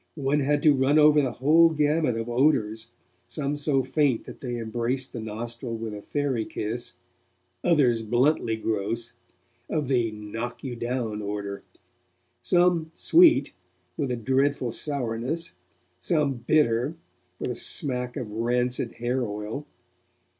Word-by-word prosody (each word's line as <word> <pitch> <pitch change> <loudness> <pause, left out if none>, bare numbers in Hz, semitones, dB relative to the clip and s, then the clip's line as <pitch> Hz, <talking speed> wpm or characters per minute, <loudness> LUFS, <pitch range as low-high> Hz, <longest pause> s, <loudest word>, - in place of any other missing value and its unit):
One 145 -1 +1
had 145 +1 +1
to 150 - +6
run 135 +2 +3
over 150 0 +6
the 130 -3 -1
whole 160 +5 +5
gamut 150 -4 +1
of 115 0 -3
odours, 120 -4 +1 0.4
some 145 -1 -2
so 145 -2 +1
faint 145 -6 +1
that - - -11
they 120 -2 -3
embraced 120 +3 -2
the 120 - -5
nostril 115 +2 -5
with 110 -1 -5
a 105 - -7
fairy 135 -2 -1
kiss, 110 +3 -4 0.7
others 130 -9 +3
bluntly 120 0 +1
gross, 110 +2 -2 0.6
of 150 -4 -1
the 120 -4 +2
'knock 110 +3 -6
you 130 -3 -4
down' 120 -3 -3
order; 100 -1 -4 0.8
some 175 -3 +2
sweet, 335 -1 +5 0.4
with 140 -4 -2
a 125 - 0
dreadful 130 +2 +1
sourness; 130 - -3 0.5
some 145 - +1
bitter, 140 -1 +2 0.4
with 125 - -3
a - - -4
smack 125 0 -1
of 120 -6 -5
rancid 120 +2 0
hair 125 +2 -1
oil. 105 +6 -5
125 Hz, 135 wpm, -26 LUFS, 115-145 Hz, 0.8 s, to